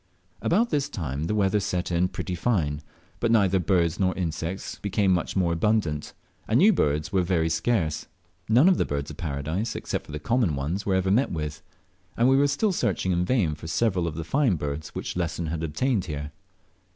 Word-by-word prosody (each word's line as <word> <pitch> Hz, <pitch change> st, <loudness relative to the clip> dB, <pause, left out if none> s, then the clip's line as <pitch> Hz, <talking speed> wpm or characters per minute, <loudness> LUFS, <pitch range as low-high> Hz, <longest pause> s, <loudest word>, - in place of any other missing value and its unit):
About 225 Hz, +8 st, +2 dB
this 145 Hz, -2 st, 0 dB
time 75 Hz, -, -3 dB
the 105 Hz, -, -1 dB
weather 100 Hz, 0 st, +2 dB
set 90 Hz, -3 st, -2 dB
in 90 Hz, +1 st, +2 dB
pretty 90 Hz, 0 st, -5 dB
fine, 85 Hz, -7 st, 0 dB, 0.4 s
but 115 Hz, -, +1 dB
neither 100 Hz, -4 st, +4 dB
birds 85 Hz, -1 st, +1 dB
nor 95 Hz, -1 st, +1 dB
insects 85 Hz, +1 st, -4 dB
became 100 Hz, -1 st, +1 dB
much 85 Hz, -2 st, -1 dB
more 90 Hz, -3 st, +2 dB
abundant, 85 Hz, -5 st, 0 dB, 0.3 s
and 110 Hz, -, +3 dB
new 210 Hz, +9 st, +6 dB
birds 75 Hz, -, 0 dB
were 95 Hz, -, +3 dB
very 85 Hz, -2 st, +1 dB
scarce. 80 Hz, -1 st, 0 dB, 0.4 s
None 125 Hz, +9 st, +6 dB
of 190 Hz, -, +4 dB
the -, -, +4 dB
Birds 70 Hz, 0 st, -3 dB
of -, -, -11 dB
Paradise 80 Hz, +8 st, -3 dB
except -, -, -4 dB
the 75 Hz, -, -4 dB
common 110 Hz, -, +1 dB
one 70 Hz, +5 st, -2 dB
were 95 Hz, -, +2 dB
ever 95 Hz, 0 st, +1 dB
met 125 Hz, +7 st, +2 dB
with, 75 Hz, -2 st, -4 dB, 0.6 s
and 120 Hz, -, +4 dB
we 135 Hz, -, +5 dB
were 140 Hz, +1 st, +4 dB
still 170 Hz, +10 st, +1 dB
searching 95 Hz, -, 0 dB
in 90 Hz, 0 st, +1 dB
vain 95 Hz, -9 st, +1 dB
for 75 Hz, +2 st, -9 dB
several 90 Hz, -2 st, +1 dB
of 80 Hz, -, -4 dB
the 80 Hz, -, -4 dB
fine 130 Hz, -, +2 dB
birds 75 Hz, 0 st, -5 dB
which -, -, -4 dB
Lesson 85 Hz, -1 st, -2 dB
had 80 Hz, 0 st, -3 dB
obtained 95 Hz, -, 0 dB
here. 75 Hz, -3 st, -5 dB
90 Hz, 200 wpm, -26 LUFS, 80-110 Hz, 0.6 s, new